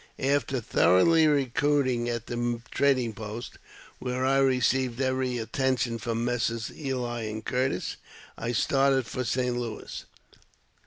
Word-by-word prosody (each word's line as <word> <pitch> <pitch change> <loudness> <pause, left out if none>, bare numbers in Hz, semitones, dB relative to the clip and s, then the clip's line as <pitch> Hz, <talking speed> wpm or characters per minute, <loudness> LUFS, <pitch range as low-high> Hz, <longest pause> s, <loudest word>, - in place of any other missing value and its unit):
After 140 -1 +1
thoroughly 115 - +4
recruiting 140 -3 +1
at 120 -1 -3
the 120 -1 -2
trading 130 -5 +2
post, 110 +1 -7 0.4
where 125 0 -2
I 135 +1 +3
re 130 -2 +3
ceived 125 -1 +1
every 130 -1 0
attention 120 0 -1
from 115 +1 -2
Messrs. 115 -2 -1
Ely 125 -5 -3
and 110 0 -5
Curtis, 130 +1 -1 0.4
I 115 +1 -3
started 135 +2 +2
for 125 - -3
St. 125 +1 0
Louis. 120 -3 -5
125 Hz, 125 wpm, -27 LUFS, 115-135 Hz, 0.4 s, thoroughly